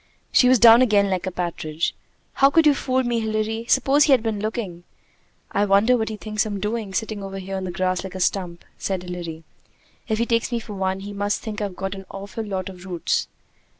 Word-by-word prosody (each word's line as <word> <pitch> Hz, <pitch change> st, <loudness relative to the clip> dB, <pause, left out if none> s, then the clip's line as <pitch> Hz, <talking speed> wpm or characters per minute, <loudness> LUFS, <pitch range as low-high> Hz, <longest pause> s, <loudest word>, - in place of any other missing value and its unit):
She 250 Hz, -, +5 dB
was 255 Hz, -, +6 dB
down 230 Hz, +1 st, +8 dB
again 205 Hz, -5 st, +3 dB
like 185 Hz, 0 st, -1 dB
a -, -, -1 dB
partridge. 170 Hz, -3 st, -2 dB, 0.4 s
"How 275 Hz, -, +5 dB
could 325 Hz, +2 st, +4 dB
you 300 Hz, -, +7 dB
fool 260 Hz, -1 st, 0 dB
me, 240 Hz, -1 st, 0 dB
Hilary? 220 Hz, +1 st, -2 dB
Suppose 285 Hz, +2 st, +4 dB
he 295 Hz, -, +2 dB
had 250 Hz, -4 st, +3 dB
been 220 Hz, -3 st, -1 dB
looking!" 205 Hz, -5 st, -4 dB, 0.7 s
"I 200 Hz, -, +1 dB
wonder 205 Hz, +5 st, +4 dB
what 220 Hz, -2 st, -1 dB
he 215 Hz, -, -5 dB
thinks 215 Hz, 0 st, -1 dB
I'm 205 Hz, -2 st, -4 dB
doing, 210 Hz, 0 st, -3 dB
sitting 215 Hz, +1 st, -3 dB
over 195 Hz, 0 st, -6 dB
here 195 Hz, 0 st, -5 dB
in 190 Hz, -1 st, -3 dB
the 180 Hz, -, -4 dB
grass 185 Hz, +1 st, -1 dB
like 190 Hz, -1 st, -8 dB
a -, -, -4 dB
stump," 180 Hz, -2 st, -1 dB
said 190 Hz, -2 st, -2 dB
Hilary. 170 Hz, -3 st, -6 dB, 0.6 s
"If 220 Hz, -, 0 dB
he 235 Hz, -, +1 dB
takes 230 Hz, 0 st, 0 dB
me 235 Hz, -, 0 dB
for 215 Hz, -2 st, -9 dB
one, 190 Hz, -1 st, -2 dB
he 205 Hz, +1 st, -7 dB
must 205 Hz, +1 st, -1 dB
think 215 Hz, -2 st, -5 dB
I've 200 Hz, -3 st, -3 dB
got 195 Hz, +1 st, -4 dB
an 195 Hz, -1 st, -9 dB
awful 200 Hz, +3 st, -6 dB
lot 190 Hz, -3 st, -4 dB
of 185 Hz, -2 st, -10 dB
roots." 180 Hz, -4 st, -1 dB
205 Hz, 225 wpm, -23 LUFS, 190-225 Hz, 0.7 s, down